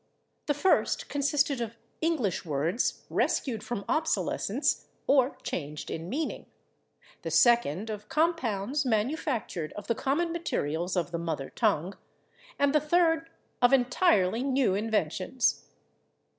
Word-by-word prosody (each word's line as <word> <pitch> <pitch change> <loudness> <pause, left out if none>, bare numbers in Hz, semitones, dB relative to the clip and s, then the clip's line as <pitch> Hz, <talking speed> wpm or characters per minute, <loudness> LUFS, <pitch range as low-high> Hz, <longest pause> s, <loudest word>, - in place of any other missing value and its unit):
The 290 - +2
first 370 +7 +2
consisted 285 -2 +1
of 230 0 -5 0.2
English 310 - 0
words 160 - -1
rescued 230 -6 0
from 220 -3 -4
obsolescence 315 +1 0 0.2
or 270 -1 +3
changed 150 -2 -5
in 165 +2 -5
meaning, 300 +7 -3 0.7
the - - -4
second 225 - +3
of 210 0 -7
compounds 285 - 0
manufactured 230 - -1
of 205 - -8
the 230 - +1
common 300 +8 0
materials 175 - -2
of 175 -1 -1
the 170 - -2
mother 160 -5 -3
tongue, 180 +6 0 0.6
and 285 0 +2
the 300 - +5
third 325 0 +2 0.3
of 245 +2 +5
entirely 245 - +3
new 265 -6 +2
inventions. 210 +2 0
240 Hz, 120 wpm, -28 LUFS, 185-290 Hz, 0.7 s, the